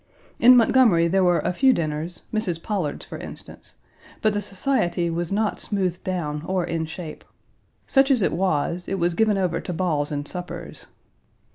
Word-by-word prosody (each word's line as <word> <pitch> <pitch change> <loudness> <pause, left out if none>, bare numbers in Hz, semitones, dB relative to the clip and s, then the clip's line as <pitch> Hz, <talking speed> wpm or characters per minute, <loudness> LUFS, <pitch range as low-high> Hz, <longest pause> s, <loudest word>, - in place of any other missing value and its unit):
In 250 +1 +8
Montgomery, 225 -8 +4
there 190 +2 +2
were 175 -1 +3
a 180 - +1
few 265 +7 +4
dinners 160 -1 -3
Mrs. 185 -7 -2
Pollard's, 190 -9 -3
for - - -8
instance, - - -10 0.5
but 215 -1 +3
the 205 - -1
society 185 -5 -1
was 170 +1 -3
not 210 +1 0
smoothed 185 -4 -2
down 150 -5 -3
or 185 -1 0
in 165 -2 -2
shape. 160 -1 -8 0.6
Such 270 0 +3
as 255 -7 +3
it - - +1
was 175 0 -1
it 195 - -2
was 175 -1 +1
given 215 +2 +2
over 180 -3 0
to 180 - -5
balls 160 -4 -1
and 145 0 -3
suppers. 180 -1 -5
180 Hz, 170 wpm, -23 LUFS, 165-205 Hz, 0.6 s, In